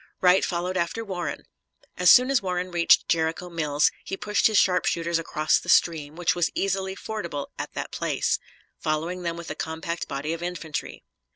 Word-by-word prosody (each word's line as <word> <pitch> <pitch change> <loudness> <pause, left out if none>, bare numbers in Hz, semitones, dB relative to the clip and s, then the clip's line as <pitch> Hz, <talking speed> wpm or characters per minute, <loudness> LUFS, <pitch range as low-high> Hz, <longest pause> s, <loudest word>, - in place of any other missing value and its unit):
Wright 180 +1 +5
followed 180 +1 -1
after 185 +6 -2
Warren. 180 -4 -4 0.5
As 180 -1 +4
soon 255 +2 +7
as 270 - +3
Warren 180 -1 -2
reached 170 -1 +4
Jericho 165 +2 -1
Mills 150 -3 +2
he 195 - -5
pushed 210 +1 +2
his 215 -2 +1
sharpshooters 170 -3 +2
across 155 -1 +1
the - - -9
stream, 155 -3 +3
which 175 -1 +1
was 175 -1 +1
easily 190 0 -1
fordable 170 -10 -5
at - - -5
that - - -5
place, - - 0 0.4
following 160 +4 -2
them 170 -1 -3
with 170 -1 -7
a - - -4
compact 165 +1 -4
body 145 +3 -3
of 165 - -6
infantry. 175 -3 -5
170 Hz, 175 wpm, -25 LUFS, 165-185 Hz, 0.5 s, soon